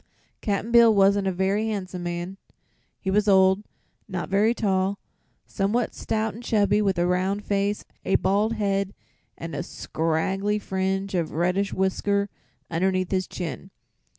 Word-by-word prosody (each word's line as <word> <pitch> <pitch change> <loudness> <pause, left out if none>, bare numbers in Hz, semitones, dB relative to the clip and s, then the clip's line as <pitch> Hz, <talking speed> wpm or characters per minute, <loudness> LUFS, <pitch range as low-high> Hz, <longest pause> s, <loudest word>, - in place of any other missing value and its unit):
Cap'n 205 +2 -1
Bill 235 -1 +7
wasn't 200 -1 +4
a - - +2
very 195 +4 0
handsome 190 -4 -4
man. 175 +2 -4 0.6
He 190 - -2
was 210 +1 +2
old, 190 0 +5 0.4
not 185 -4 -4
very 210 +4 +3
tall, 195 -2 0 0.5
somewhat 215 +4 -1
stout 220 0 -2
and 230 - -9
chubby, 210 -3 +2
with 195 -3 +1
a 175 - +2
round 185 +3 0
face, 200 0 0 0.2
a 195 - +1
bald 210 +3 +2
head 200 -2 -1 0.4
and 165 0 -6
a - - -2
scraggly 180 +5 -1
fringe 190 0 -2
of 170 -3 -1
reddish 180 +4 +1
whisker 200 +1 0 0.4
underneath 185 +2 0
his 185 -1 0
chin. 165 -9 -6
195 Hz, 145 wpm, -25 LUFS, 185-205 Hz, 0.6 s, Bill